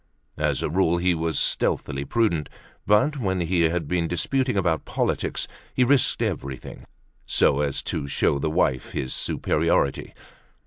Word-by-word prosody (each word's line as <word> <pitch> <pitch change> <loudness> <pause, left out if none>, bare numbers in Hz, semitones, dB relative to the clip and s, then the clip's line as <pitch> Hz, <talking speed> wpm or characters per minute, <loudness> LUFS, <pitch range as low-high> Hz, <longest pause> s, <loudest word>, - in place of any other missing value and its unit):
As - - 0
a - - -1
rule 85 -1 +2
he 90 +1 +2
was 80 -2 -1
stealthily 70 -1 0
prudent, 85 - 0 0.4
but 130 +9 +3
when 95 -5 -1
he 85 +1 +1
had 85 -2 -2
been 85 0 0
disputing 125 +7 0
about 85 -4 +1
politics - - -1 0.3
he 130 - +4
risked 135 +1 +3
everything, 65 -1 -5 0.4
so 70 - +3
as 70 -2 -1
to 70 - -3
show 70 0 +1
the 75 - -1
wife 75 -5 0
his 65 - -2
superiority. 70 - 0
85 Hz, 145 wpm, -24 LUFS, 75-100 Hz, 0.4 s, he